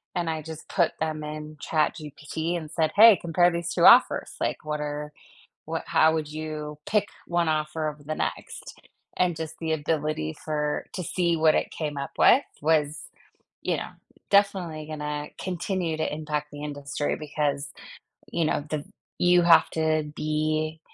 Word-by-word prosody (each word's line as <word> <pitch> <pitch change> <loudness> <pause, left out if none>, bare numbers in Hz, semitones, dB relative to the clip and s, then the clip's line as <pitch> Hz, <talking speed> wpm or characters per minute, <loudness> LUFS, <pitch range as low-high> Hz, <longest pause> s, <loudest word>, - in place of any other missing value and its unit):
and 175 -2 -1
I 160 -1 -2
just 160 0 -9
put 175 -4 +2
them 155 -1 -2
in 150 0 -7
ChatGPT 155 +1 -2
and 155 -2 -7
said, 160 -2 +1
"Hey, 220 0 +9
compare 175 +1 +3
these 170 -1 -3
2 - - +3
offers." - - +6
Like, - - -2
what 150 0 -2
are 150 0 -4 0.5
what 165 +1 -3
how 160 -1 +4
would 155 -2 -2
you 155 -1 -5
pick 210 -1 +1 0.2
one 170 -2 +1
offer 155 0 -1
over 150 -1 -11
the 155 +1 -4
next? - - -5 0.4
And 180 -2 +2
just 160 0 -6
the 160 -1 -2
ability 150 - -1
for 150 -1 -1
to 185 - -3
see 170 -1 0
what 155 -1 +4
it - - 0
came 150 -2 -4
up 140 - -4
with 270 - +6 0.2
was, 155 -1 +1 0.5
you - - 0
know, - - -5 0.4
definitely 190 -6 +2
gonna 150 -1 -4
continue 180 -2 -2
to 155 - -1
impact 150 -1 -3
the 145 0 -8
industry 145 0 -3
because, 145 -2 -2 0.6
you 170 - 0
know, 155 - +1
the 150 -2 -2 0.3
you 175 0 +5
have 170 -1 +6
to 155 -1 +1
be 155 +1 -1
155 Hz, 165 wpm, -26 LUFS, 150-165 Hz, 0.6 s, Hey